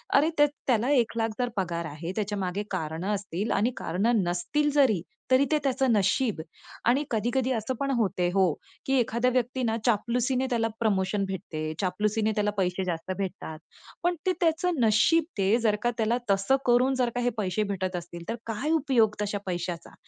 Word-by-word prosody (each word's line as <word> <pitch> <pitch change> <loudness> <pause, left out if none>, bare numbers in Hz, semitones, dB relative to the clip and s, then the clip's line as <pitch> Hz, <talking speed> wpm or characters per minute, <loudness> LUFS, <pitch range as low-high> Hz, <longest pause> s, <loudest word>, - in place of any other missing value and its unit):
अरे, 295 +3 +5
त्य 295 - +7 0.2
त्याला 245 0 +2
1 235 -5 +2
लाख 225 0 +1
जर 245 -1 +1
पगार 170 -3 -1
आहे, 160 +3 -5
त्याच्यामागे 205 -2 -2
कारणं 170 +3 -2
असतील 200 +1 -3
आणि 235 +5 +2
कारणं 205 +5 +1
नसतील 180 - 0
जरी, 250 - +4 0.3
तरी 260 +2 +5
ते 305 - +4
त्याचं 265 -1 +1
नशीब. 215 0 +2 0.5
आणि 260 +5 +3
कधी-कधी 240 +4 0
असं 225 +3 -2
पण 275 0 0
होते 190 -5 +1
हो, 190 -5 +3 0.3
की 270 - 0
एखाद्या 235 +1 +1
व्यक्तीनं 245 -2 0
चापलुसीने 245 +3 +1
त्याला 230 -2 +1
प्रमोशन 200 -2 +1
भेटते, 155 -5 -4
चापलुसीने 210 +4 0
त्याला 210 0 +1
पैसे 185 0 0
जास्त 175 0 -3
भेटतात. 185 -5 -5 0.4
पण 350 0 +2
ते 370 - +3
त्याचं 335 -1 +1
नशीब 225 +10 +4 0.2
ते, 195 +4 +3
जर 220 -2 +2
का 240 - +2
त्याला 230 +1 +1
तसं 195 +7 +3
करून 250 +2 +4
जर 245 -1 +2
का 245 - 0
हे 245 - +2
पैसे 205 +1 0
भेटत 185 -1 -2
असतील, 170 0 -8
तर 230 - -1
काय 230 +8 -2
उपयोग 260 -9 +3
तशा 205 0 -1
पैशाचा? 175 -2 -4
220 Hz, 175 wpm, -27 LUFS, 190-250 Hz, 0.5 s, त्य